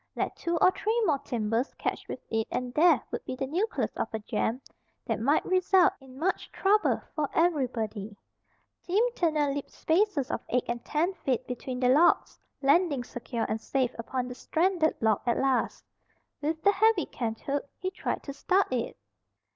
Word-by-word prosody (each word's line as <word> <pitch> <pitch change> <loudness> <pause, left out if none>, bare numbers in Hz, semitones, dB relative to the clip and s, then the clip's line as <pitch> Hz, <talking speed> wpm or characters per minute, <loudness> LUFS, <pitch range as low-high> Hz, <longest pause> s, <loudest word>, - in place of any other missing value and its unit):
Let - - -2
two 340 -1 -1
or 365 - +5
three 440 +5 0
more 300 -6 +2
timbers 235 -2 -2
catch - - -3
with - - -5
it 225 0 0
and 250 -1 -3
there 310 -4 +5
would - - -4
be 255 - -5
the 270 - -2
nucleus 365 - -1
of - - -1
a 220 - -2
jam 220 +2 -1 0.5
that - - -1
might 285 +6 +2
result 370 0 +4
in 265 -1 -14
much 360 +6 -1
trouble 420 +2 +2
for 300 -2 0
everybody. 235 - 0 0.6
Tim 395 +6 +2
Turner 305 - +1
leaped 285 0 -5
spaces 325 -5 +1
of - - -2
eight 250 0 +1
and 240 0 -3
ten 335 +5 0
feet 265 -9 -2
between 250 0 -5
the 250 -1 +3
logs, 305 +7 +4 0.2
landing 285 -2 +3
secure 240 -1 -4
and 220 - -2
safe 255 -1 0
upon 250 +2 -3
the 250 - -6
stranded 330 +4 +1
log 220 -2 +2
at 235 - +2
last. 270 -1 0 0.6
With 315 +2 -2
the 405 - +6
heavy 420 -2 +3
canthook 270 +5 -3
he 370 0 -3
tried - - -3
to 280 - -6
start 370 +2 +1
it. 240 -2 -2
280 Hz, 175 wpm, -28 LUFS, 245-350 Hz, 0.6 s, the